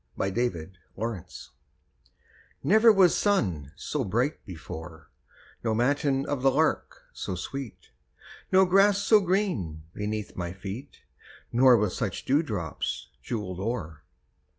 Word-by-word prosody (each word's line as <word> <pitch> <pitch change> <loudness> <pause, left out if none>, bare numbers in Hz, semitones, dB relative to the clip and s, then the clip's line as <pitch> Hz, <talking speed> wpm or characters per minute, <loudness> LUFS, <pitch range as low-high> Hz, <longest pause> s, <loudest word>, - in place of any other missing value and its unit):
A 95 - 0
SUMMER 95 -8 -2 0.3
MORNING 110 -4 -3 1.4
Never 220 +3 +6
was 190 -4 +5
sun 90 - 0
so 150 +6 -3
bright 120 +8 -1
before, 80 -2 -9 0.5
No 110 -2 0
matin 135 +3 +1
of 145 -3 -2
the 135 - +5
lark 155 +4 0
so 95 - -4
sweet, 130 +6 -7 0.6
No 190 0 +6
grass 195 +2 +5
so 210 +1 +5
green 180 - -1
beneath 105 0 -4
my 85 -1 -4
feet, 100 +8 -8 0.5
Nor 125 0 +6
with 105 -3 0
such - - -3
dewdrops 105 - -1
jewelled 95 - -4
o'er. 95 -8 -4
115 Hz, 120 wpm, -27 LUFS, 95-150 Hz, 1.4 s, Never